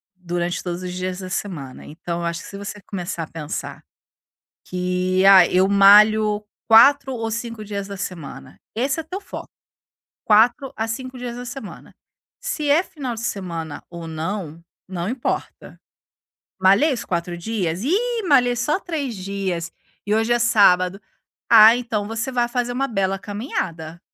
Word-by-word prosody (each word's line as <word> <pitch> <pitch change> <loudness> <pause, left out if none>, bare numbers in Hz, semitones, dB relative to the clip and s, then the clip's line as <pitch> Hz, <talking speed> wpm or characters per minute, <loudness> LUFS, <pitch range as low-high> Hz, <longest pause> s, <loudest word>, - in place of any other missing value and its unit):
durante 175 -1 -3
todos 175 0 -4
os 180 -1 -5
dias 185 0 -4
da 185 -1 -7
semana. 170 -9 -5
Então 170 +2 -5
eu - - -3
acho 170 0 -3
que - - -11
se 200 - -9
você 200 +1 -7
começar 175 -4 -5
a - - -8
pensar 160 0 -6 0.8
que: 180 +1 -1
"Ah, 190 -2 +9
eu 185 +1 +3
malho 210 +1 +6 0.2
4 265 +4 +6
ou 225 -2 -3
5 230 -1 -5
dias 200 -1 -5
da 200 - -7
semana", 150 -9 -8
esse 265 +6 -1
é - - -3
teu 365 +6 -6
foco, - - -9 0.7
4 235 +5 +3
a 220 - -1
5 255 +3 -6
dias 245 -1 -5
da 245 - -7
semana. 260 +2 -9 0.5
Se 300 -2 -3
é 320 +6 +4
final 265 -9 -6
de 225 - -6
semana 170 -8 -5
ou 170 -1 -8
não, 165 0 -5 0.2
não 180 -1 -4
importa. 250 +1 -4 0.8
Malhei 200 +11 +4
os 235 - -5
4 175 0 -3
dias? 180 -1 -3
"Ih, 455 - 0
malhei 250 -5 +4
só 300 +10 0
3 295 -10 -4
dias, 190 -3 -4 0.4
e 205 - +1
hoje 225 +2 +1
é 240 - +3
sábado". 195 -5 +4 0.5
Ah 225 0 +9
então 225 -4 -3
você 225 +3 -3
vai 240 -1 +1
fazer 245 0 -2
uma 270 +2 -1
bela 195 -4 -1
caminhada. 185 - -5
205 Hz, 160 wpm, -21 LUFS, 180-240 Hz, 0.8 s, Ah